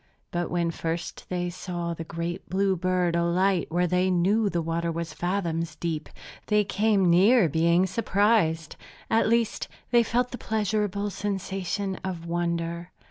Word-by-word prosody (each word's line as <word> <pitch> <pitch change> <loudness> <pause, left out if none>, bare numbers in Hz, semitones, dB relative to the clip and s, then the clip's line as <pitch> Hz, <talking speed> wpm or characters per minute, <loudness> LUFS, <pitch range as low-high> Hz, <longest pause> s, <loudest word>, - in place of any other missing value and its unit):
But 175 0 -2
when 170 -1 0
first 165 +1 -4
they 175 -1 -2
saw 175 -1 -4
the 165 - -6
great 170 +2 -5
blue 190 +1 +2
bird 180 -1 +1
alight 175 +2 +2
where 175 +2 +2
they 180 +2 +2
knew 200 +4 +2
the 175 - -1
water 165 +1 -1
was 165 0 -4
fathoms 170 -3 -2
deep, 160 -1 -3 0.4
they 210 0 +3
came 200 -1 +2
near 190 +5 +5
being 170 +4 +3
surprised. 190 -5 +1 0.3
At 225 -1 +3
least, 230 -1 +1 0.2
they 240 -1 +6
felt 245 +2 0
the 245 - -6
pleasurable 210 -1 -1
sensation 195 -1 -3
of 180 -3 -4
wonder. 170 0 -2
180 Hz, 145 wpm, -26 LUFS, 170-200 Hz, 0.4 s, they